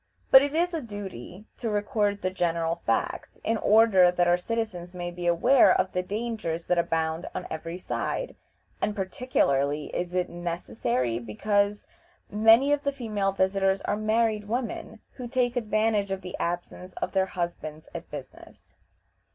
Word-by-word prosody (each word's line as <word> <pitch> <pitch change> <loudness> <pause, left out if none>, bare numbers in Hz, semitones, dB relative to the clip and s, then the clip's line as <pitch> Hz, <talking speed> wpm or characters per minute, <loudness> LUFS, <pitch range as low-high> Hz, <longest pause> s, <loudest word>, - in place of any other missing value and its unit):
But 265 - +10
it 285 +2 -1
is 350 +2 +1
a 325 - -2
duty 200 - -8
to 230 - -3
record 205 -1 0
the 185 - 0
general 170 -2 -1
facts, - - -1
in 225 - +1
order 210 -5 +5
that 175 0 +1
our 175 - +5
citizens 180 -3 -4
may 175 -1 -4
be 175 0 -4
aware 175 +10 +5
of 185 0 +1
the 180 - 0
dangers 205 -4 -3
that 180 -1 +2
abound 160 0 -1
on - - -4
every 165 +2 -5
side; - - -3 0.5
and 210 - 0
particularly 150 - 0
is 175 0 -3
it 180 -1 +1
necessary 170 - -2
because 200 - 0 0.5
many 225 +6 +5
of 290 - +1
the 280 - +1
female 215 -7 -1
visitors 195 0 +1
are - - -1
married 215 0 +1
women, 225 -1 -4 0.2
who 250 -2 -5
take 245 0 0
advantage 215 -3 +1
of 195 0 -3
the 180 -1 -6
absence 175 +1 -4
of - - -4
their 190 -1 +1
husbands 170 -4 -5
at - - -7
business. - - -11
195 Hz, 160 wpm, -27 LUFS, 175-225 Hz, 0.5 s, But